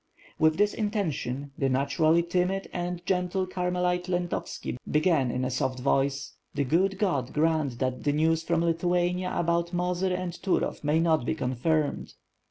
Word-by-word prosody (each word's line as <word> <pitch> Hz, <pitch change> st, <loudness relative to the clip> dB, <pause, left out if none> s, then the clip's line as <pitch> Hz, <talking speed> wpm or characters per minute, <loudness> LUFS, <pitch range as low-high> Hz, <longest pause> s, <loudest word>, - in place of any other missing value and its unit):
With 155 Hz, 0 st, +4 dB
this 205 Hz, 0 st, +3 dB
intention, 155 Hz, -, -2 dB
the 135 Hz, -, +2 dB
naturally 155 Hz, +5 st, +2 dB
timid 180 Hz, +3 st, 0 dB
and 175 Hz, 0 st, -4 dB
gentle 185 Hz, 0 st, 0 dB
Car 180 Hz, -1 st, -2 dB
melite 180 Hz, 0 st, 0 dB
Lento 175 Hz, -1 st, 0 dB
vski -, -, -6 dB
began 150 Hz, -4 st, +2 dB
in 125 Hz, +1 st, -1 dB
a 130 Hz, -, -2 dB
soft 130 Hz, +1 st, -1 dB
voice: 135 Hz, +1 st, 0 dB, 0.2 s
"The 145 Hz, -, +1 dB
good 185 Hz, +8 st, +1 dB
God 145 Hz, -, 0 dB
grant 155 Hz, -5 st, +1 dB
that 130 Hz, 0 st, -2 dB
the 145 Hz, -, +2 dB
news 160 Hz, +2 st, +2 dB
from 170 Hz, 0 st, 0 dB
Lithuania 175 Hz, +2 st, +1 dB
about 170 Hz, +1 st, 0 dB
Mozyr 180 Hz, +1 st, 0 dB
and 180 Hz, -1 st, -3 dB
Turov 185 Hz, -2 st, -1 dB
may 150 Hz, +2 st, +2 dB
not 160 Hz, -4 st, +2 dB
be 140 Hz, -, -1 dB
confirmed." 145 Hz, +3 st, -1 dB
165 Hz, 165 wpm, -27 LUFS, 145-180 Hz, 0.2 s, With